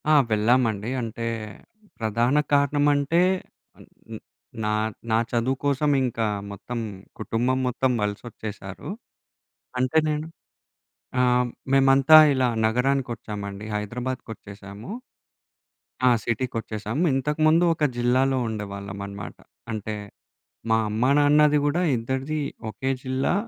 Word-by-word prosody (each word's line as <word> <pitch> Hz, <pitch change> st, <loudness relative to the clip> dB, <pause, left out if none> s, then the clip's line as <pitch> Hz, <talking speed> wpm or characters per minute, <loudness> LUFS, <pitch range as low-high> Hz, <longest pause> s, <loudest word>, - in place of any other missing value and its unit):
ఆ! -, -, +6 dB, 0.2 s
వెళ్ళామండి. 110 Hz, 0 st, +2 dB
అంటే 115 Hz, 0 st, -5 dB, 0.7 s
ప్రధాన 115 Hz, +5 st, +1 dB, 0.2 s
కారణం 145 Hz, 0 st, +3 dB
అంటే 145 Hz, +5 st, +2 dB, 0.9 s
న్ -, -, -5 dB, 0.5 s
నా, 105 Hz, -, 0 dB, 0.4 s
నా 110 Hz, -, +4 dB
చదువు 125 Hz, +3 st, 0 dB
కోసం 145 Hz, +1 st, +2 dB
ఇంకా 115 Hz, -3 st, -1 dB, 0.3 s
మొత్తం 100 Hz, +4 st, -6 dB, 0.4 s
కుటుంబం 125 Hz, +3 st, 0 dB
మొత్తం 130 Hz, +1 st, +1 dB
వలసొచ్చేసారు. 105 Hz, +2 st, -6 dB, 0.9 s
అంటే 130 Hz, +4 st, +1 dB
నేను 150 Hz, +1 st, -2 dB, 0.9 s
ఆహ్, 125 Hz, 0 st, +3 dB, 0.3 s
మేమంతా 135 Hz, +2 st, +6 dB, 0.2 s
ఇలా 130 Hz, -2 st, +2 dB, 0.2 s
నగరానికి 125 Hz, +3 st, +1 dB
ఒచ్చామండి 100 Hz, -1 st, -7 dB
హైదరాబాద్‌కొచ్చేసాము. 105 Hz, -2 st, -6 dB, 1.2 s
ఆ! -, -, +8 dB, 0.2 s
సిటీకొచ్చేసాము. 115 Hz, +1 st, -2 dB
ఇంతకుముందు 155 Hz, +5 st, +3 dB
ఒక 155 Hz, -, 0 dB
జిల్లాలో 130 Hz, +2 st, +2 dB
ఉండేవాళ్ళం 100 Hz, -2 st, -6 dB
అన్నమాట. 100 Hz, -1 st, -8 dB, 0.4 s
అంటే 110 Hz, 0 st, -4 dB, 0.7 s
మా 110 Hz, -, +4 dB
అమ్మానాన్నది 145 Hz, +6 st, +4 dB
గూడా 150 Hz, +5 st, +1 dB, 0.2 s
ఇద్దరిది 130 Hz, +6 st, -2 dB, 0.3 s
ఒకే 130 Hz, +6 st, -2 dB
జిల్లా. 130 Hz, +3 st, 0 dB
125 Hz, 95 wpm, -24 LUFS, 110-135 Hz, 1.2 s, ఆ